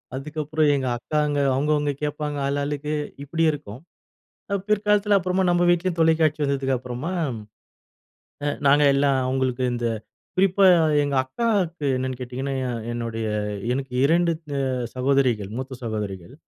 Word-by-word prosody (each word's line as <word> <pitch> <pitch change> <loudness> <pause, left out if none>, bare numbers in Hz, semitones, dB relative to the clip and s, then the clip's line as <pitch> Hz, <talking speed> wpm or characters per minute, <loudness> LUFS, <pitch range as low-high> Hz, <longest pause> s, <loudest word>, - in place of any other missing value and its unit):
அதுக்கப்புறம் 155 +2 -1
எங்க 130 -2 -1
அக்காங்க. 150 +2 -1 0.2
அவங்க 140 +3 0
அவங்க 145 -1 0
கேட்பாங்க 150 0 -2
ஆளாளுக்கு, 145 +1 -2 0.3
இப்படி 165 +3 -1
இருக்கும். 140 -7 -8 0.7
அ - - +3
பிற்காலத்துல 210 -1 +3
அப்புறமா 185 +1 0
நம்ப 175 0 +2
வீட்லயும் 175 0 +1
தொலைக்காட்சி 160 -1 +3
வந்ததுக்கப்புறமா, 135 +2 -2 1.3
அ - - 0 0.2
நாங்க 145 +2 +5
எல்லாம் 140 -1 +2
அவங்களுக்கு 130 -1 0
இந்த 120 0 -2 0.5
குறிப்பா 195 +1 +3 0.4
எங்க 145 -1 -1
அக்காக்கு 180 - -1
என்னன்னு 130 0 -3
கேட்டீங்கன்னா, 130 +2 -4
எ - - -2 0.2
என்னுடைய 115 -1 -3 0.5
எனக்கு 135 0 -3
2 170 +3 +3 0.3
அ 135 - 0 0.3
சகோதரிகள், 125 -6 +1
மூத்த 130 -1 -6
சகோதரிகள். 105 -1 -5
145 Hz, 125 wpm, -24 LUFS, 130-160 Hz, 1.3 s, நாங்க